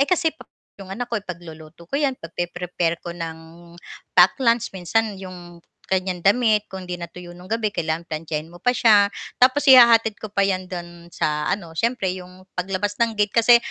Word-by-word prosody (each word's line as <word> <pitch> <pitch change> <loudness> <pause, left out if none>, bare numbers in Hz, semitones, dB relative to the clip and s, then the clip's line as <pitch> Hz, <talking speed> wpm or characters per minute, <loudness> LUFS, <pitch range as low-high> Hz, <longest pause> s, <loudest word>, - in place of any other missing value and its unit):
eh, 280 - +3
kasi 340 -3 +2
pa - - -16 0.3
'yong 195 - -10
anak 245 +3 -5
ko 230 - +1
ipagluluto 170 -3 -10
ko - - -5
'yan, 280 -3 +1
pagpre-prepare 175 -1 -3
ko 175 - -5
ng 165 -2 -6 0.8
pack 180 +1 +6
lunch 235 -2 +2
minsan 205 +4 0
'yong 175 -2 -10 0.3
kanyang 185 -1 -1
damit 210 +2 +3
kung 190 -1 -8
'di 180 -1 -6
natuyo 175 +1 -9
ng 180 +1 -13
gabi 220 -1 -1
kailangan 160 -1 -2
plantsahin 155 0 -5
mo 175 - -14
pa 245 +3 +1
siya. 210 -4 +5 0.3
Tapos 260 +3 +5
ihahatid 235 -4 +7
ko 215 - -6
pa 200 -1 +1
'yan 185 -1 -2
do'n 175 -1 -8
sa 150 -2 -1
ano, 185 -5 -3
siyempre 225 0 0
'yong 185 0 -12
paglabas 195 +3 -2
ng 230 -1 +1
gate 205 -1 +1
kasi, 235 +1 +7
185 Hz, 185 wpm, -22 LUFS, 175-225 Hz, 0.8 s, ihahatid